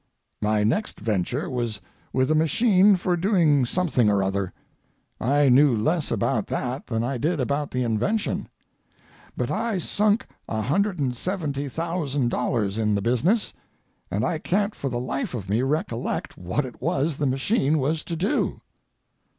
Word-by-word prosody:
My 105 0 +2
next 125 - 0
venture 110 - -1
was 120 -5 -2 0.3
with 130 +3 +1
a - - +5
machine 190 - +4
for 180 0 0
doing 165 - +3
something 145 - +2
or 100 -1 +2
other. 95 -1 -1 0.7
I 140 +4 +3
knew 130 -1 +5
less 155 +8 0
about - - 0
that 130 +2 -3
than 115 -2 -1
I 125 +1 -2
did 160 +4 0
about 140 +3 -1
the 125 0 -1
invention. 120 - -1 0.9
But - - -1
I 225 -2 -1
sunk 210 +5 +1 0.2
$170,000 140 - -1
in 105 -2 +2
the 100 - 0
business, 145 - +1 0.6
and 105 +3 0
I 160 - -1
can't 205 +5 0
for 135 - -4
the 120 -1 -2
life 125 +1 -3
of 100 -5 -5
me 105 +5 +1
recollect 135 -4 -2
what 90 +11 -2
it 125 - -10
was 150 0 0
the 145 - 0
machine 135 - +1
was 155 +3 0
to 170 - -3
do. 180 +6 0
140 Hz, 145 wpm, -25 LUFS, 120-170 Hz, 0.9 s, a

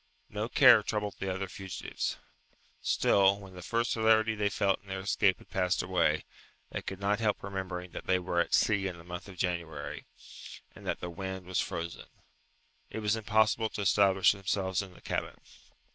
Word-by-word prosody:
No 105 +2 -3
care 125 -5 +8
troubled 105 -1 -3
the 95 -1 -2
other 95 +1 -3
fugitives. 95 0 -4 0.6
Still, 100 0 +3
when 95 -2 -12
the 90 - -9
first 115 +5 0
hilarity 110 0 +4
they 105 -1 0
felt 100 -2 +1
in 100 - -24
their 95 0 -4
escape 100 0 +2
had - - -19
passed 90 -1 +1
away, 90 -4 +1 0.5
they - - -3
could 95 - -6
not 100 +2 +1
help 105 -2 0
remembering 95 -2 -5
that - - -8
they 95 - +4
were 90 -1 -1
at 85 - +3
sea 100 -3 +2
in 90 -2 -5
the 85 - -12
month 90 +2 -7
of 95 - -12
January, 85 -5 -3 0.7
and - - -12
that - - -2
the 90 - -4
wind 95 +1 -5
was 90 0 0
frozen. 85 0 -5 0.8
It 110 - -5
was 105 +1 +2
impossible 110 0 +2
to 105 - -5
establish 95 -1 +4
themselves 95 -1 -1
in 95 -2 -10
the - - -16
cabin. - - -3
95 Hz, 185 wpm, -30 LUFS, 90-105 Hz, 0.8 s, care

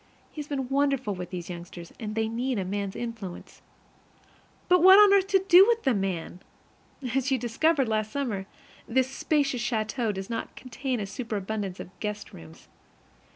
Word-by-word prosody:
He 305 - -6
has 295 - -9
been 270 -3 -3
wonderful 275 -5 +1
with 180 -1 -6
those 175 -2 -6
youngsters, 170 -1 -9
and 215 -2 -5
they 220 0 0
need 245 +2 -2
a 190 - -2
man's 200 0 -3
influence. 225 -7 -7 1.1
But 360 -1 +5
what 380 +2 +9
on 410 -1 +8
earth 390 -1 +4
to 385 -2 +2
do 380 +2 +8
with 465 -1 +1
the 265 - +3
man? 190 -4 -3 0.7
As 270 0 +1
you 265 - +2
discovered 265 +4 +1
last 215 -1 -1
summer, 220 -9 -3 0.4
this 260 +2 +1
spacious 275 -3 0
château 225 0 -1
does 190 -1 -6
not 230 - -5
contain 255 0 -4
a 205 - -2
superabundance 205 -3 -4
of - - -8
guest 210 -1 -5
rooms. 80 -1 -13
230 Hz, 170 wpm, -27 LUFS, 200-275 Hz, 1.1 s, what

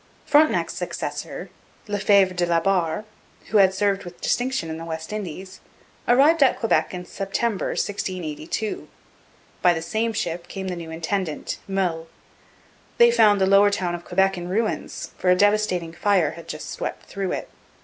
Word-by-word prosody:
Frontenac's 305 +1 +3
successor, - - -5 0.4
Lefebvre 200 -2 +3
de 175 -1 +1
la 170 -1 +3
Barre, 180 +1 0 0.5
who 215 - +4
had 190 -1 +6
served 195 +1 0
with 175 0 -11
distinction 255 -7 0
in 160 - -5
the - - -6
West 160 +3 -5
Indies, 190 -2 -6 0.5
arrived 285 +6 +5
at 270 - +5
Quebec 225 - +1
in 180 -1 -6
September 195 +3 -2
1682. 185 0 -3 0.7
By 175 -1 +5
the 165 - -3
same 225 +6 -1
ship 175 -4 -3
came 190 +1 -5
the 180 - -3
new 170 -2 -7
intendant, 165 0 -3
Meulles. 180 -4 -1 0.9
They 475 0 +7
found 210 - +5
the 190 - +4
Lower 200 +1 +6
Town 185 -4 -1
of 175 0 -5
Quebec 190 +1 +1
in 175 0 -6
ruins, 215 +3 -2
for 185 - +1
a 180 - +6
devastating 200 -4 +2
fire 185 -2 +2
had 170 0 -11
just 155 - -6
swept - - -5
through 195 -1 -3
it. - - -4
190 Hz, 160 wpm, -23 LUFS, 175-205 Hz, 0.9 s, They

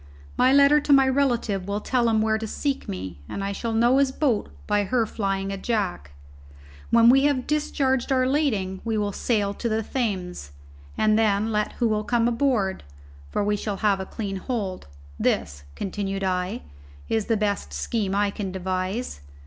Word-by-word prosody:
My 255 - +4
letter 280 +2 +6
to 290 - -1
my 270 -1 +6
relative 240 -8 0
will 200 +1 -1
tell 240 +1 +1
him 220 -1 +2
where 220 0 +1
to 220 - -4
seek 275 +5 -3
me, 90 -4 -6
and 200 - -4
I 200 - -2
shall 230 +3 -3
know 240 +4 +4
his 275 -1 +3
boat 265 -6 0 0.2
by 205 0 +1
her 240 +2 +1
flying 195 -2 -2
a 195 - -3
jack. 90 - -2 0.8
When 230 0 +5
we 270 +3 +6
have 280 -3 +1
discharged 280 -3 0
our 255 -1 +3
lading 220 -10 0
we 225 -1 -1
will 205 -1 0
sail 205 -1 0
to 235 +3 -3
the 220 0 0
Thames, 185 - -3 0.4
and 215 0 +3
then 215 0 +2
let 210 -1 0
who 240 - 0
will 215 -1 0
come 230 +2 +1
aboard, 230 -6 +1 0.5
for 205 - -1
we 210 +1 +1
shall 205 -1 -3
have 205 -2 +2
a 190 - -5
clean 200 -3 -4
hold. 195 - -4 0.3
This," 70 0 -1
continued 195 0 -3
I, 185 +3 -1 0.4
"is 220 -2 0
the 225 - +2
best 200 - -1
scheme 195 - -2
I 205 0 +2
can 200 -2 -4
devise. 185 - -3
215 Hz, 180 wpm, -24 LUFS, 195-245 Hz, 0.8 s, letter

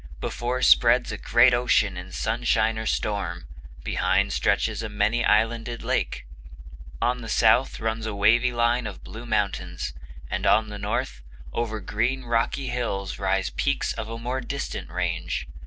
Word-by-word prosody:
Before 125 +1 -2
spreads 120 +1 +5
a - - -4
great 120 +1 +5
ocean 120 -5 +2
in 90 +1 -8
sunshine 110 0 0
or 110 - -4
storm; 90 -5 -2 0.4
behind - - +1
stretches - - +1
a 115 - -4
many 105 +3 +1
islanded 115 +2 +1
lake. - - -1 0.7
On 125 0 0
the 115 - -7
south 130 +4 +3
runs 110 0 -2
a 105 - -4
wavy 115 +5 +4
line 120 0 +1
of 100 - -9
blue 115 +2 -9
mountains; 90 - -2 0.3
and - - -2
on 110 0 +4
the 105 -1 -7
north, 105 - -3 0.3
over 115 -2 -2
green 120 +7 -1
rocky 120 +3 0
hills 100 -7 -3
rise 95 -1 0
peaks 140 -1 0
of 110 - -6
a 115 - -5
more 125 +3 -3
distant 140 +3 -5
range. - - -2
115 Hz, 155 wpm, -25 LUFS, 105-120 Hz, 0.7 s, spreads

